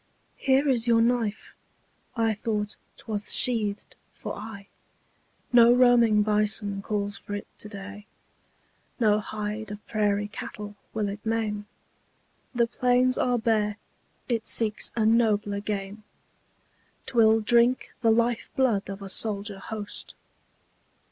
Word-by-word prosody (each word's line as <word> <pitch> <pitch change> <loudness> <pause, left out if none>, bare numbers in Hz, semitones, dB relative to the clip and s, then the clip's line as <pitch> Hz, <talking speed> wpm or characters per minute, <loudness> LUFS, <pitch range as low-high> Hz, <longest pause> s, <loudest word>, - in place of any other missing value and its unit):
Here 270 +1 +2
is 245 -3 +1
your 230 -1 +4
knife! 230 -3 -1 0.6
I 225 -2 +1
thought 210 -1 -3 0.2
'twas 210 -2 -3
sheathed 215 -5 +1 0.2
for - - -6
aye. 205 -1 -9 0.9
No 235 -1 +7
roaming 240 -4 +5
bison 210 -1 +1
calls 205 0 -2
for 205 - -7
it 205 - -6
to 210 - -8
day; 205 0 -9 0.9
No 210 -3 +3
hide 215 0 -5
of 210 0 -9
prairie 205 -1 0
cattle 210 0 -8 0.2
will 215 -2 -2
it 205 +1 -6
maim; 215 -2 -2 0.9
The 235 -1 +3
plains 250 +1 +2
are 245 -1 +2
bare, 220 -2 0 0.5
it 230 -3 -2
seeks 215 -2 +1
a 220 -2 +1
nobler 215 -3 +2
game: 205 0 -5 1.0
'Twill 225 -3 +4
drink 235 +3 +3
the 230 - +3
life 235 +1 +1
blood 235 -8 +1
of 195 0 -7
a - - -6
soldier 200 0 +1
host. 210 +1 -6
215 Hz, 125 wpm, -26 LUFS, 205-235 Hz, 1.0 s, No